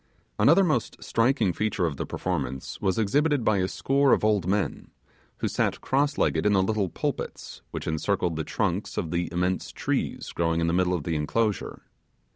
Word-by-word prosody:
Another 170 Hz, +7 st, +6 dB
most 150 Hz, -, 0 dB
striking 115 Hz, -5 st, +2 dB
feature 105 Hz, -3 st, 0 dB
of 75 Hz, -5 st, -2 dB
the -, -, -4 dB
performance 70 Hz, -8 st, -3 dB
was 95 Hz, -2 st, +1 dB
exhibited 145 Hz, +6 st, +2 dB
by 110 Hz, -2 st, +3 dB
a 95 Hz, -1 st, +1 dB
score 135 Hz, +6 st, +2 dB
of -, -, +2 dB
old 105 Hz, -5 st, +2 dB
men, 100 Hz, +2 st, -1 dB, 0.5 s
who -, -, -1 dB
sat -, -, 0 dB
cross 145 Hz, +2 st, 0 dB
legged -, -, +1 dB
in 105 Hz, -, +3 dB
the 95 Hz, -1 st, +4 dB
little 100 Hz, -1 st, 0 dB
pulpits, -, -, -4 dB
which -, -, -6 dB
encircled 85 Hz, +2 st, 0 dB
the 80 Hz, -, -2 dB
trunks -, -, -2 dB
of 80 Hz, -, -2 dB
the 85 Hz, 0 st, -1 dB
immense 90 Hz, +2 st, -1 dB
trees -, -, -2 dB
growing 85 Hz, -1 st, 0 dB
in 85 Hz, -, +1 dB
the 85 Hz, -, +1 dB
middle 90 Hz, 0 st, +2 dB
of 80 Hz, -, -3 dB
the 80 Hz, +1 st, -2 dB
enclosure. 105 Hz, +7 st, -1 dB
95 Hz, 185 wpm, -26 LUFS, 85-115 Hz, 0.5 s, Another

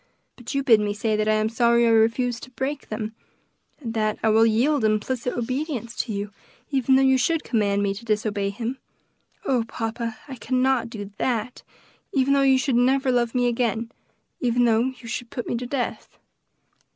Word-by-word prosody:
But 245 Hz, +2 st, -7 dB
you 275 Hz, -, +1 dB
bid 230 Hz, -5 st, +6 dB
me 205 Hz, -1 st, -1 dB
say 215 Hz, +1 st, 0 dB
that 215 Hz, 0 st, 0 dB
I 215 Hz, -, +3 dB
am 215 Hz, 0 st, +1 dB
sorry 235 Hz, +1 st, +3 dB
I 230 Hz, -, +4 dB
refused 230 Hz, +2 st, +2 dB
to -, -, -18 dB
break 265 Hz, +4 st, -4 dB
them; 215 Hz, 0 st, -4 dB, 0.7 s
and 235 Hz, -6 st, -5 dB
that 215 Hz, -1 st, 0 dB
I 220 Hz, -, +4 dB
will 225 Hz, +1 st, +5 dB
yield 245 Hz, +5 st, +2 dB
implicit 220 Hz, +4 st, 0 dB
obedience 255 Hz, -1 st, -3 dB
to 235 Hz, -, -2 dB
you, 200 Hz, 0 st, -4 dB, 0.4 s
even 265 Hz, -1 st, +3 dB
though 265 Hz, -, +4 dB
you 265 Hz, -1 st, +4 dB
should 325 Hz, +5 st, +1 dB
command 205 Hz, -3 st, +1 dB
me 200 Hz, -1 st, 0 dB
to 205 Hz, +4 st, -10 dB
disobey 210 Hz, -2 st, -1 dB
him. 235 Hz, +6 st, -4 dB, 0.7 s
Oh, 255 Hz, -7 st, +2 dB
papa, 225 Hz, 0 st, -4 dB
I 265 Hz, -2 st, -8 dB
cannot 255 Hz, 0 st, +1 dB
do 205 Hz, -3 st, -7 dB
that, 245 Hz, -1 st, -2 dB, 0.5 s
even 275 Hz, 0 st, +2 dB
though 280 Hz, -, +3 dB
you 270 Hz, -1 st, +5 dB
should 260 Hz, -1 st, +1 dB
never 265 Hz, +2 st, +3 dB
love 240 Hz, -1 st, 0 dB
me 245 Hz, 0 st, +2 dB
again; 230 Hz, -1 st, 0 dB, 0.5 s
even 245 Hz, 0 st, +2 dB
though 230 Hz, 0 st, +3 dB
you 255 Hz, -2 st, -6 dB
should 235 Hz, +1 st, -5 dB
put 245 Hz, -2 st, -5 dB
me -, -, -1 dB
to 245 Hz, +1 st, -5 dB
death." 250 Hz, -1 st, -4 dB
235 Hz, 190 wpm, -24 LUFS, 220-260 Hz, 0.7 s, bid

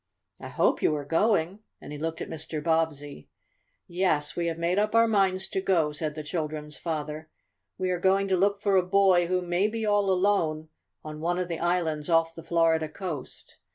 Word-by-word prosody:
I -, -, -8 dB
hope -, -, +1 dB
you 155 Hz, -, +2 dB
are 145 Hz, -1 st, -5 dB
going?" 180 Hz, +3 st, +1 dB, 0.2 s
and -, -, -11 dB
he 145 Hz, -, -7 dB
looked 165 Hz, +1 st, -4 dB
at -, -, -4 dB
Mr. 160 Hz, -1 st, -5 dB
Bobbsey. 150 Hz, -, -2 dB, 0.6 s
"Yes, 175 Hz, -5 st, 0 dB
we 170 Hz, -1 st, -1 dB
have 165 Hz, -1 st, -2 dB
made 170 Hz, +3 st, 0 dB
up 215 Hz, +2 st, 0 dB
our 230 Hz, 0 st, +5 dB
minds 190 Hz, -3 st, +2 dB
to 190 Hz, -, -2 dB
go," 170 Hz, -6 st, +2 dB
said 150 Hz, 0 st, -4 dB
the 155 Hz, -, -5 dB
children's 150 Hz, -1 st, -4 dB
father. 155 Hz, -1 st, -5 dB, 0.5 s
"We 185 Hz, 0 st, -1 dB
are 180 Hz, -, -1 dB
going 195 Hz, +2 st, +2 dB
to 190 Hz, -, +3 dB
look 200 Hz, +2 st, +1 dB
for 200 Hz, -2 st, +3 dB
a -, -, +5 dB
boy 185 Hz, -1 st, +3 dB
who 180 Hz, 0 st, 0 dB
may 175 Hz, +3 st, +1 dB
be 225 Hz, 0 st, -3 dB
all 205 Hz, -1 st, +2 dB
alone 180 Hz, -5 st, +1 dB, 0.4 s
on 155 Hz, 0 st, -7 dB
one 175 Hz, +2 st, -1 dB
of 180 Hz, -1 st, -2 dB
the 165 Hz, -, -3 dB
islands 165 Hz, -3 st, -1 dB
off 165 Hz, 0 st, +3 dB
the 165 Hz, -, -9 dB
Florida 165 Hz, -1 st, +1 dB
coast. 155 Hz, -6 st, -8 dB
170 Hz, 200 wpm, -27 LUFS, 155-190 Hz, 0.6 s, our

